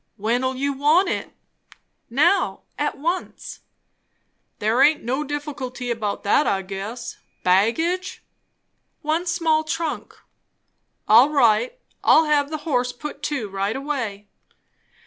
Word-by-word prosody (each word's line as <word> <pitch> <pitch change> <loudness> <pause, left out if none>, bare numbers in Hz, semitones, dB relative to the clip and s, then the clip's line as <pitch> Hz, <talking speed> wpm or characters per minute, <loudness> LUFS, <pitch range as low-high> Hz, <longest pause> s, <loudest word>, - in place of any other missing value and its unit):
"When'll 245 +5 0
you 280 +2 -1
want 300 +8 +3
it?" - - -3 0.8
"Now. 285 +11 +2
At - - -2
once." 340 +6 -4 1.0
"There 220 +5 +1
aint 300 +2 +4
no 260 +5 -1
difficulty 270 -4 -5
about 215 -3 -3
that, 205 +8 +3
I 195 -1 0
guess. 200 +5 -6 0.3
Baggage?" 320 - +1 0.8
"One 320 +4 0
small 325 -3 +2
trunk." 325 0 -4 0.9
"All 235 +6 +7
right 290 - +3 0.3
I'll 320 - +6
have 290 -2 +2
the 310 -1 -6
horse 250 -5 0
put 290 +3 -8
to 275 -8 -2
right 195 +2 -2
away." 250 -8 -4
275 Hz, 115 wpm, -22 LUFS, 230-310 Hz, 1.0 s, All